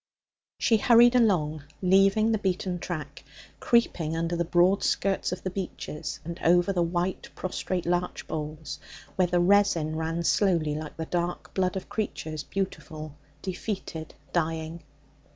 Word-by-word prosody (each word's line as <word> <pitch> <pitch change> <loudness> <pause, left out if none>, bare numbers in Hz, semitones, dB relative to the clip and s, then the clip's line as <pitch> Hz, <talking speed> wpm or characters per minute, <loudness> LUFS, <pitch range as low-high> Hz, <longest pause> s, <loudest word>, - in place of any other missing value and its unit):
She 225 - +3
hurried 235 +2 +6
along, 170 - +2 0.2
leaving 195 +4 +4
the 220 - +1
beaten 185 -2 -1
track, 170 -4 -6 0.4
creeping 165 -9 +1
under 165 +1 -1
the 170 - +1
broad 175 +3 +3
skirts 195 -2 0
of 180 - -5
the 185 - -2
beeches 180 -5 -5
and 170 +1 -6
over 175 +3 +4
the 180 - +1
white 175 +2 -1
prostrate 185 -1 -3
larch 175 +1 -1
boles 155 0 -5 0.4
where 185 -1 +3
the 175 0 +2
resin 175 -4 +3
ran 160 +1 -2
slowly 170 -5 +2
like 155 0 -6
the 160 - -3
dark 175 +1 -3
blood 185 -1 0
of 190 - -4
creatures 155 -8 -3
beautiful, 155 -6 -5 0.3
defeated, 185 -4 -5 0.2
dying. 165 0 -1
175 Hz, 140 wpm, -27 LUFS, 160-195 Hz, 0.4 s, hurried